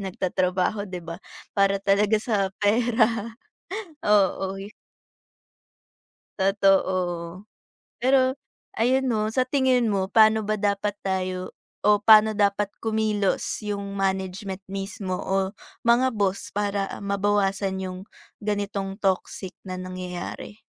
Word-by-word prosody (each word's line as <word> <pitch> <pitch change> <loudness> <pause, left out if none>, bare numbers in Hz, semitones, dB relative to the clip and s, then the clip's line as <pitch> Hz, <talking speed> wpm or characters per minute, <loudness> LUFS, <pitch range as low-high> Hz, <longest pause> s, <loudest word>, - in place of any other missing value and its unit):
nagtatrabaho, 185 +1 -1
'di 180 -2 -7
ba, 165 +2 -7 0.3
para 200 -1 +3
talaga 200 +2 +2
sa 210 -3 0
pera. 225 +1 +1 0.7
Oo. 195 -2 +2 1.8
Totoo. 190 -2 +1 0.5
Pero 260 +1 +3 0.4
ayun 260 +4 +3
'no, 215 -2 +1
sa 240 +4 +1
tingin 255 -3 +2
mo, 195 -2 0
pa'no 220 +1 +4
ba 215 - +1
dapat 205 0 0
tayo 185 -1 -2 0.3
o 210 0 +5
pa'no 215 0 +7
dapat 205 -1 +1
kumilos 215 -3 0
yung 200 -1 -3
management 190 0 -2
mismo 195 -1 -4
o 190 0 0 0.3
mga 240 +1 +4
boss 195 -2 -1
para 200 -1 -1
mabawasan 200 -1 0
yung 185 -1 -5 0.4
ganitong 200 -2 -2
toxic 190 -1 -1
na 185 - -4
nangyayari? 185 +3 -6
200 Hz, 105 wpm, -25 LUFS, 190-215 Hz, 1.8 s, pa'no